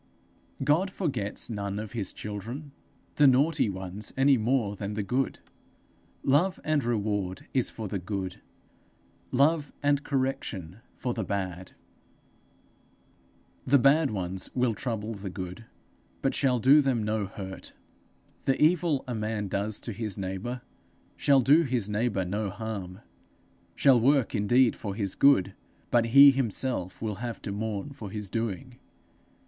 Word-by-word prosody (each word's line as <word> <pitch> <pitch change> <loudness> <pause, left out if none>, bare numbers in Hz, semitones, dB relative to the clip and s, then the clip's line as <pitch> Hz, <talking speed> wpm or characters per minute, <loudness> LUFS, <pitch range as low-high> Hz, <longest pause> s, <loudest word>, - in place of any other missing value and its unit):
God 155 +8 +2
forgets 130 - -3
none 100 -3 -4
of 105 -1 -5
his 110 -5 -3
children 115 +8 -7 0.5
the 145 - +7
naughty 140 0 +3
ones 95 +2 -5
any 135 +1 +5
more 115 -3 0
than 100 +1 -5
the 105 - -1
good. 125 +5 -1 0.8
Love 170 +8 +2
and 155 -3 +1
reward 105 -5 -2
is 130 -3 +2
for 110 -2 -6
the 100 0 -3
good: 95 0 -5 0.9
love 145 +2 +2
and 145 0 +2
correction 130 - -3 0.2
for 125 - -3
the 110 - -3
bad. 95 -2 -4 1.9
The 140 +2 +6
bad 140 +3 +4
ones 95 -3 -3
will 125 -2 +2
trouble 115 -2 -4
the 100 -2 -6
good, 90 +3 -7 0.6
but 135 - +1
shall 130 -3 +2
do 135 +6 +6
them 130 -5 0
no 105 -1 -1
hurt. 95 -1 -8 0.7
The 135 - +1
evil 160 -2 +3
a 125 - -3
man 110 -2 -2
does 100 +2 -1
to 115 - -4
his 105 -2 -4
neighbour, 100 +6 -4 0.5
shall 140 -2 +4
do 145 +6 +5
his 125 -9 -1
neighbour 105 -3 0
no 100 +3 -2
harm, 100 -2 -6 0.7
shall 135 -3 +5
work 135 +1 +3
indeed 120 +4 +3
for 100 -3 -5
his 100 -3 -1
good; 140 -10 +4 0.4
but 120 -1 +4
he 140 +4 +9
himself 120 -6 -2
will 105 -3 -2
have 120 -2 -4
to 100 - -4
mourn 105 +5 -3
for 115 -8 -8
his 105 -1 -5
doing. 115 +3 -4
115 Hz, 145 wpm, -28 LUFS, 100-135 Hz, 1.9 s, he